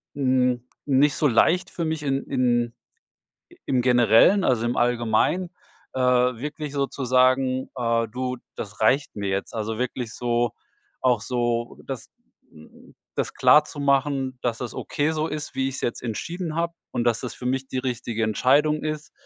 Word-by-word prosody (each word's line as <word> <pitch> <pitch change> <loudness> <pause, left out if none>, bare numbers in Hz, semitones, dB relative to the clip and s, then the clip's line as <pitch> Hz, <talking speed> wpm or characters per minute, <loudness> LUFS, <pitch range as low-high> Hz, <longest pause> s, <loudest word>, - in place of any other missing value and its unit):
n 130 -3 +1 0.2
nicht 140 0 +3
so 150 - +2
leicht 175 +9 +3
für 170 - -4
mich 160 -1 -2
in 135 -1 0
in 120 -3 +1 0.8
i - - -18
im 130 -2 +1
Generellen, 125 - +5
also 120 -6 +2
im 120 - 0
Allgemeinen, 120 +9 +1 0.4
äh, 130 - -2
wirklich 125 +4 0
so 140 -1 0
zu 135 - -5
sagen, 130 +1 +2
äh: 115 -2 0
„Du, 125 +2 -3 0.2
das 105 0 -8
reicht 135 +6 +2
mir 100 -1 -3
jetzt.“ 95 0 -2
Also, 110 0 -3
wirklich 125 -2 -3
so 120 -1 0 0.5
auch 125 -4 +2
so 120 +1 -2
das 135 -3 -6 0.4
hm, 80 0 -17 0.2
das - - -2
klarzumachen, 140 -3 +2
dass 120 -2 -1
das 125 - -5
okay 150 +2 -1
so 155 0 -1
ist, 150 -1 -5
wie 135 0 0
ich's 135 - -5
jetzt 120 - -3
entschieden 160 - -4
habe 170 +1 -1 0.2
und 120 - -1
dass 115 -1 +1
das 125 - -5
für 125 - -5
mich 130 +1 -1
die 130 - -3
richtige 120 -3 -3
Entscheidung 140 +8 +2
ist, 155 -1 -4
130 Hz, 165 wpm, -24 LUFS, 120-140 Hz, 0.8 s, Generellen